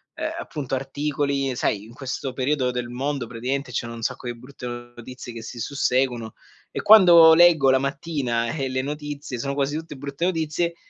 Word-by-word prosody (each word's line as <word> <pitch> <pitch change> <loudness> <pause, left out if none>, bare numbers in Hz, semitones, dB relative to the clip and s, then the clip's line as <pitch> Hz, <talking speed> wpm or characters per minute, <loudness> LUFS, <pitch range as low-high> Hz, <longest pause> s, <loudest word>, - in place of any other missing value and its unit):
ehm, - - -3
appunto 135 -3 -4
articoli, 140 0 -1
sai, 100 - 0
in 110 - -13
questo 130 0 -4
periodo 130 0 0
del 125 -1 -3
mondo 135 0 -3
praticamente 125 +4 -3
ci - - +1
sono 115 0 -7
un 115 - -8
sacco 125 - -3
di 120 -1 -4
brutte 130 +1 -11
notizie 120 +1 -9
che 115 - -7
si 120 - -8
susseguono, 125 -3 0 0.4
e - - -3
quando 175 -6 +8
leggo 160 -5 +6
la 130 - +4
mattina, 135 -4 -2
e 135 -4 -2
le 130 0 -1
notizie 145 -2 -5
sono 140 +3 -2
quasi 140 +1 -1
tutte 160 -2 -7
brutte 140 +3 -6
notizie, 170 -1 -1
135 Hz, 180 wpm, -24 LUFS, 125-145 Hz, 0.4 s, quando